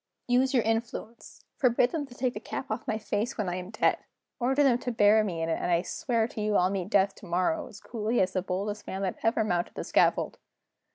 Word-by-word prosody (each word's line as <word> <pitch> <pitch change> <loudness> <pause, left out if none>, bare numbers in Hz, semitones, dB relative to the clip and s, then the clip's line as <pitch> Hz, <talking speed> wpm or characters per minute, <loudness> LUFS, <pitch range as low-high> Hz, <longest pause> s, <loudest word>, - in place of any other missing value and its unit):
Use 255 +2 +3
your 245 -4 +3
influence 225 0 -4
forbid 245 -2 +3
them 300 -4 -3
to 245 - -14
take 250 0 -1
the - - -5
cap 270 - -6
off - - -4
my 220 - 0
face 215 +1 -2
when 210 -4 -1
I 180 0 -2
am 180 0 -6
dead 215 - +1 0.4
order 265 +4 +2
them 250 -3 +4
to 245 - -3
bury 215 -1 +5
me 170 -5 -2
in 165 - -1
it, 165 - 0
and - - -1
I 170 0 +3
swear 230 0 0
to 220 - -6
you 210 0 0
I'll 180 0 +3
meet 190 -2 -3
death 195 -1 +3
tomorrow 185 - -1
as 205 - -12
coolly 225 0 -2
as 185 0 +2
the 185 - 0
boldest 200 +3 -4
man 190 +1 -3
that 185 - -2
ever 225 0 +2
mounted 175 -4 -1
the - - -4
scaffold!" - - +2
215 Hz, 235 wpm, -28 LUFS, 190-245 Hz, 0.4 s, bury